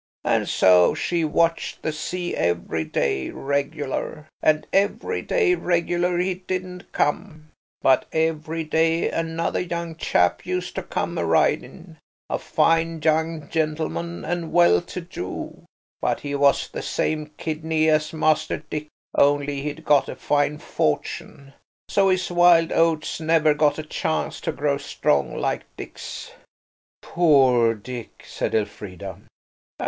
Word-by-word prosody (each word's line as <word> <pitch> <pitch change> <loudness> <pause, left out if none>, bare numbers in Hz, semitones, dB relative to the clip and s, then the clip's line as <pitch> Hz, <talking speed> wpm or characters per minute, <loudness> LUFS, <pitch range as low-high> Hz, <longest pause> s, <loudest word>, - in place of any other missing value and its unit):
And - - +1
so 90 -1 +5
she 170 -1 -1
watched 165 +2 0
the 155 - 0
sea 175 +3 -4
every 85 -2 -1
day 70 -3 -1
regular, 145 +2 -3
and 155 0 +3
every 200 +1 +1
day 430 -7 +2
regular 175 - 0
he 180 +1 +1
didn't 180 0 -6
come. 155 +1 -2 0.3
But 130 -1 +4
every 160 0 -1
day 160 +1 +1
another 165 0 -1
young 170 -2 -4
chap 90 - +1
used 180 0 -3
to - - -3
come - - -3
a - - 0
riding–a - - -1
fine 165 0 +1
young 160 -1 +1
gentleman 160 +2 -2
and 175 -2 -3
well 85 0 +5
to 180 - -7
do, 95 - -7 0.4
but - - 0
he 145 -1 -4
was 140 0 +3
the - - -6
same 155 -1 -1
kidney 160 0 -1
as 155 -1 +2
Master 155 -1 0
Dick, 150 0 -3 0.3
only 145 0 +2
he'd 150 +2 -5
got 145 -2 +4
a - - -5
fine 145 0 0
fortune, 140 - -3 0.3
so 195 -1 +3
his 185 -1 0
wild 175 -1 +5
oats 165 -2 +1
never 160 -1 +3
got 150 0 +2
a 155 - -4
chance 155 +1 -2
to 160 - -1
grow 145 -2 -1
strong 70 - 0
like - - -1 0.2
Dick's." - - -8 0.7
"Poor 130 -9 +4
Dick!" 120 +2 -9
said - - -3
Elfrida. 100 -3 -4
155 Hz, 135 wpm, -23 LUFS, 140-165 Hz, 0.7 s, so